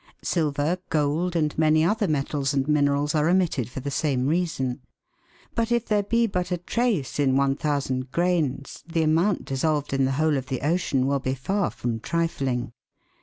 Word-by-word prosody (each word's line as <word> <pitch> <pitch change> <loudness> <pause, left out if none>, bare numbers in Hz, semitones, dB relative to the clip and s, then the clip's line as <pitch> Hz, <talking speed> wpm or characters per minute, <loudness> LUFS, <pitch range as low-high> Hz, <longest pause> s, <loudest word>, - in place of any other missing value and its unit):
Silver, 155 +1 0
gold, 160 +4 0
and 155 -3 0
many 155 0 +4
other 210 +3 +1
metals 145 -2 -1
and 135 0 0
minerals, 145 -1 +2
are 155 +1 +2
omitted 175 - +1
for 130 - -6
the 140 +2 -4
same 135 -3 0
reason. 145 -5 -1 0.7
But 230 0 -1
if 235 -1 +1
there 210 -1 +2
be 230 +3 +1
but 180 -4 -2
a 180 - +1
trace 185 - -1
in 135 -2 +3
1,000 135 -2 0
grains 165 -6 -1
the 165 -1 0
amount 165 +6 +2
dissolved 145 +1 -1
in 135 -1 +2
the 135 - 0
whole 155 +1 +2
of 130 -1 -5
the 130 -2 -3
ocean 145 -3 +1
will 140 0 +1
be 130 0 -2
far 190 - -1
from 120 0 -3
trifling. 130 -6 -2
150 Hz, 170 wpm, -25 LUFS, 135-175 Hz, 0.7 s, many